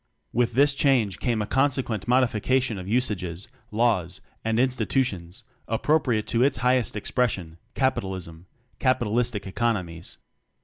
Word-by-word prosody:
With 120 0 +1
this 140 +3 +4
change 125 -9 +2
came 115 -3 0
consequent 130 -4 0
modification 125 -2 +1
of 90 - -8
usages, 100 -6 -1 0.2
laws, 105 -6 0 0.2
and 110 0 0
institutions 125 -8 -1 0.2
appropriate 120 -2 +1
to 115 - +1
its 135 0 +3
highest 125 -3 +2
expression 100 -7 -1 0.2
Capitalism 95 -10 -2 0.3
capitalistic 120 -4 +1
economics. 95 -6 -3
115 Hz, 105 wpm, -25 LUFS, 95-130 Hz, 0.3 s, this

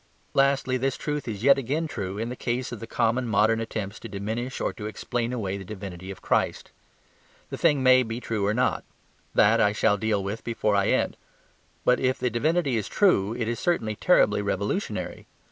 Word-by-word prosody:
Lastly, 135 -2 +2
this 130 +1 -1
truth 150 -3 -3
is 105 -2 -5
yet 140 +1 +6
again 145 +6 -1
true 100 -8 -5
in 115 +2 -3
the 125 - -5
case 125 +1 -2
of 120 - -6
the 115 - -8
common 120 +2 0
modern 110 +1 +3
attempts 110 -2 -5
to 115 - -9
diminish 110 +6 -4
or - - -1
to 105 -3 -6
explain 120 +2 -3
away 100 -6 -2
the - - -7
divinity 95 -2 -8
of 100 - -9
Christ. - - 0 0.8
The - - -4
thing 140 -3 +3
may 130 0 +7
be 115 -1 -4
true 110 -3 -2
or 100 +1 +2
not; 125 +1 +1 0.5
that - - +5
I 105 0 +3
shall 105 -1 +2
deal 105 -1 0
with 100 +3 -4
before 110 -3 0
I 100 -1 +2
end. - - +1 0.7
But 125 - +4
if 130 0 +1
the 125 - -1
divinity 145 +2 +1
is 105 - -2
true 115 - +2
it 115 -2 -2
is 120 0 -2
certainly 110 -12 0
terribly 105 - +3
revolutionary. 100 - -3
115 Hz, 195 wpm, -26 LUFS, 105-130 Hz, 0.8 s, may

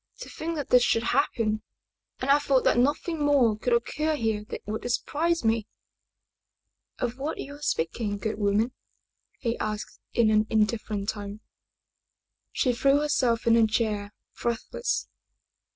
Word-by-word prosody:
To - - -7
think 330 +1 -4
that 290 -4 -4
this 250 - +6
should 230 -1 +2
happen 230 -4 +1 0.6
and 265 +2 +1
I 285 - +6
thought 275 -3 +2
that - - +3
nothing 295 +4 +1
more 270 -7 +4
could 240 +3 -2
occur 305 +6 +1
here 220 -5 -1
that - - -7
would 220 +3 -3
surprise 330 +4 0
me! 225 -1 +1 0.6
" - - -56
"Of 245 +1 -3
what 290 +3 -3
are - - -4
you 285 +1 -9
speaking, 205 - -1
good 215 +1 -3
woman?" 210 +4 +1 0.6
he 235 -2 -2
asked 215 0 -4
in 225 -2 +4
an 215 0 +3
indifferent 215 -2 0
tone. 205 0 -5 1.1
She 250 - +1
threw 275 +4 +3
herself 255 -6 +1
into 230 0 +5
a - - +1
chair, 215 -2 -1 0.3
breathless. 235 - -2
235 Hz, 150 wpm, -27 LUFS, 215-280 Hz, 1.1 s, this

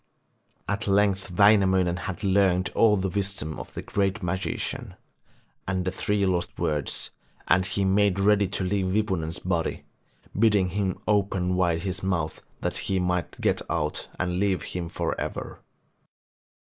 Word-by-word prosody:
At 105 +3 -2
length 100 -1 +2
Wainamoinen 95 -2 +4
had 95 +3 -5
learned 95 -2 +2
all 105 -2 +4
the 95 0 0
wisdom 95 -5 -2
of - - -8
the - - -5
great 100 +1 -1
magician, 95 +2 -3 0.7
and 95 -1 -1
the 95 - 0
three 100 +1 0
lost 90 -2 -1
words, 75 -3 -1 0.4
and 90 +1 +3
he 95 0 0
made 100 0 +3
ready 100 0 +4
to 95 0 -2
leave 95 0 0
Wipunen's 95 -5 -1
body, 85 -3 -2 0.5
bidding 100 -3 +3
him 95 0 -1
open 95 -3 +1
wide 85 -3 +1
his 95 -1 -3
mouth 85 -5 -1 0.2
that - - -1
he 95 -1 +2
might 90 -1 -1
get - - +1
out - - -1
and 90 0 -1
leave 100 -2 +1
him 85 -2 -3
for - - -2
ever. - - -5
95 Hz, 150 wpm, -26 LUFS, 90-100 Hz, 0.7 s, Wainamoinen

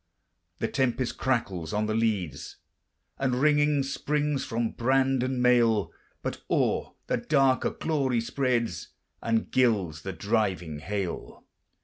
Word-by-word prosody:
The - - -1
tempest 130 -2 -1
crackles 100 -11 -1
on 105 +1 +1
the 110 - -1
leads, 110 -7 -1 0.6
And, 130 -2 +1
ringing, 145 0 +3
springs 145 +1 -1
from 115 0 -1
brand 135 +1 +2
and 130 0 -1
mail; 115 -7 +4 0.3
But - - -4
o'er - - +1
the - - 0
dark 135 -3 +2
a - - +3
glory 135 -6 0
spreads, 115 - -1 0.3
And 115 -1 0
gilds 100 -11 +2
the 95 - -4
driving 95 -4 -1
hail. 95 +1 -4
120 Hz, 125 wpm, -27 LUFS, 105-135 Hz, 0.6 s, mail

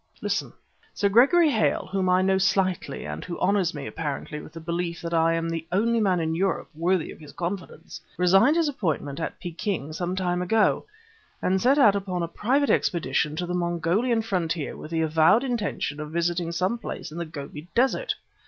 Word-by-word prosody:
Listen. - - -2 0.4
Sir 200 - +2
Gregory 285 - +5
Hale, 220 -4 +1
whom 190 -1 +1
I 185 +1 +4
know 190 0 +2
slightly 185 -6 0
and 75 +1 -5
who 170 - -6
honors 190 -2 +2
me, 140 -2 -5
apparently, 150 0 -4
with - - -12
a - - -6
belief 170 +1 -3
that 170 0 -4
I 165 0 +3
am 165 0 -1
the 165 -1 -4
only 230 +5 +2
man 190 -5 +2
in 160 -1 -1
Europe 190 +3 -1
worthy 170 +2 0
of - - -12
his 150 -2 -12
confidence, 175 +1 -6 0.2
resigned 195 - +5
his 335 -2 +2
appointment 160 - -2
at 165 - -4
Peking 175 -3 -4
some 175 +3 -2
time 180 -1 -1
ago, 215 - +2 0.5
and 190 +1 +1
set 265 +4 +4
out 215 -8 +6
upon 185 -3 -2
a - - -1
private 265 - +1
expedition 155 -3 +1
to 175 +2 -2
the 175 - -4
Mongolian 180 +7 +1
frontier 170 -7 -2
with - - -9
the 165 0 0
avowed 160 - +4
intention 215 - -2
of 150 0 -5
visiting 170 0 -1
some 185 +7 -1
place 205 - -6
in 165 - -6
the 170 - -2
Gobi 150 0 -8
Desert. 265 - +2
180 Hz, 190 wpm, -25 LUFS, 165-200 Hz, 0.5 s, out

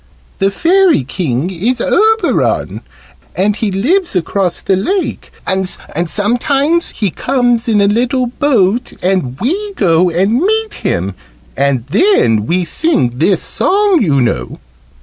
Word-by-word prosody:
"The 195 - +2
Fairy 345 - +2
King 140 +2 -2
is 225 +8 -1
Oberon, 440 - +1 0.5
and 200 +2 +1
he 220 -1 -2
lives 290 - 0
across 180 0 -1
the 195 - +1
lake 370 - -2
and 190 -1 -1
sometimes 245 - -1
he 205 -5 -2
comes 245 0 0
in 215 -2 +2
a - - +4
little 245 +4 +1
boat 245 -4 0
and 175 -9 -1
we 400 - -2
go 175 - +2
and 195 +8 +1
meet 440 +3 0
him 90 +3 -2 0.4
and 140 -4 0
then 130 - +2
we 180 +1 0
sing 150 - 0
this 180 +1 +2
song, 395 -4 +2
you 145 -8 +2
know." 65 - -2
205 Hz, 130 wpm, -14 LUFS, -, 0.5 s, a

